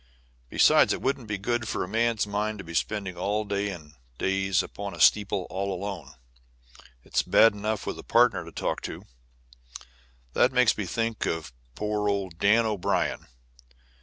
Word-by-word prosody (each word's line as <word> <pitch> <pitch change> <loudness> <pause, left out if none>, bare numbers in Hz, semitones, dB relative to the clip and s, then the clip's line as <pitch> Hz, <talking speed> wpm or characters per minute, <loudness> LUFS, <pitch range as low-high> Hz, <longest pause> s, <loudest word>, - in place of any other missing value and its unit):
Besides, - - +5
it - - -5
wouldn't 135 -3 -1
be 105 -1 -2
good 120 +3 -2
for - - -2
a - - -5
man's 115 +2 +1
mind 105 +1 -2
to 95 - -8
be 85 -1 -9
spending 100 +2 -2 0.3
days 100 0 -1
and 75 -5 -10 0.2
days 95 0 +1
upon 100 -1 -7
steeples 100 -3 +3
all 100 +1 -2
alone. 95 +1 -5 0.9
It's - - 0
bad 115 -1 +5
enough 105 +1 -3
with - - -4
a - - -9
partner 115 -7 +3
to 85 - -11
talk - - -3
to. - - -7 1.3
That 130 - +3
makes 125 -2 +4
me 100 -3 -4
think 115 +2 -2
of 80 -6 -3 0.2
poor 105 0 -1
old 95 -4 -3
Dan 110 +3 +4
O'Brien. 105 -5 -1
100 Hz, 160 wpm, -27 LUFS, 95-110 Hz, 1.3 s, Besides